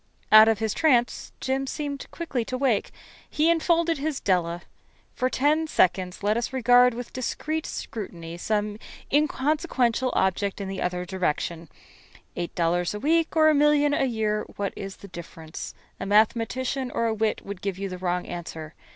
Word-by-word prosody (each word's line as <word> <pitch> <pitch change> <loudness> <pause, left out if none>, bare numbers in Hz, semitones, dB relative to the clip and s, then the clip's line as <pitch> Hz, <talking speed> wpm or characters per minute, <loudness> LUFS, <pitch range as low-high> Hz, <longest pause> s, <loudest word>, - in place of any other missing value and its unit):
Out 215 0 +10
of 225 -1 +3
his 220 0 -1
trance 245 -7 +2
Jim 270 +1 -1
seemed 285 0 -4
quickly 300 -8 -3
to 255 - -3
wake. 255 -5 +1 0.4
He 315 +2 +3
enfolded 335 -1 +2
his 300 -1 -2
Della. 175 -2 0 0.5
For 255 - 0
ten 300 +5 +2
seconds 185 - +1
let 210 +1 +2
us 235 - -2
regard 245 -1 +5
with 245 0 -7
discreet 310 +5 -3
scrutiny 170 -6 -6
some 210 +1 -1 0.3
inconsequential 275 -4 +1
object 190 +2 0
in 200 - -4
the 195 -1 -4
other 180 0 -2
direction. 170 -2 -2 0.7
Eight 175 -1 -4
dollars 175 +2 0
a - - -4
week 330 +6 +1
or 310 -1 +6
a - - +4
million 295 0 +4
a 275 - +2
year 215 -3 0
what 200 -1 -3
is 195 -1 -6
the 200 - -12
difference? 165 -3 -9 0.2
A 195 - -4
mathematician 240 +5 +1
or 230 - -1
a 225 - +1
wit 220 0 -1
would 200 -2 -7
give 195 -2 -3
you 195 0 -3
the 185 -1 -7
wrong 180 -1 -1
answer. 160 -2 -7
225 Hz, 170 wpm, -25 LUFS, 190-275 Hz, 0.7 s, Out